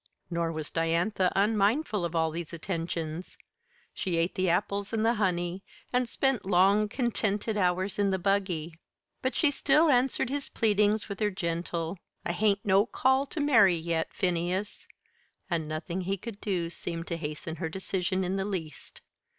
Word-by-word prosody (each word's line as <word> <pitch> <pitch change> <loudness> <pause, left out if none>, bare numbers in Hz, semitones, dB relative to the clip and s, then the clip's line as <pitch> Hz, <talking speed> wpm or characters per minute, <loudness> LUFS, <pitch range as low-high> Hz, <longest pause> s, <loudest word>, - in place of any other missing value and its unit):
Nor 170 -1 0
was 155 -2 -5
Diantha 170 +3 +1
unmindful 210 - +2
of 170 0 -3
all 160 -1 +2
these 170 +1 -6
attentions. 165 -1 -4 0.6
She 180 -3 -1
ate 165 +2 +1
the 185 -1 +1
apples 200 +4 0
and 220 0 +1
the 230 - +4
honey, 180 -3 -1 0.3
and 250 -1 +1
spent 270 -3 +1
long 195 +3 +4
contented 220 -3 -1
hours 185 0 0
in 200 -1 +3
the 190 - +1
buggy; 180 -4 -1 0.4
but 260 - -1
she 305 -4 +3
still 300 +3 +3
answered 260 -1 +2
his 285 0 -3
pleadings 210 -1 +2
with 200 -2 -6
her 210 -1 +2
gentle: 170 -1 -3 0.3
"I - - 0
hain't 200 +2 +1
no 200 +2 +4
call 265 +2 +2
to 310 - -4
marry 220 - +5
yet, 165 0 -2
Phineas," 180 +2 -2 0.6
and 165 -2 0
nothing 160 +4 -3
he 195 +2 -1
could 210 +1 -8
do 175 -5 -1
seemed 165 -1 -5
to 170 - -3
hasten 160 +2 -5
her 160 - -3
decision 190 +1 -1
in 185 +2 -1
the 195 - 0
least. 165 -8 -6
190 Hz, 165 wpm, -29 LUFS, 170-210 Hz, 0.6 s, marry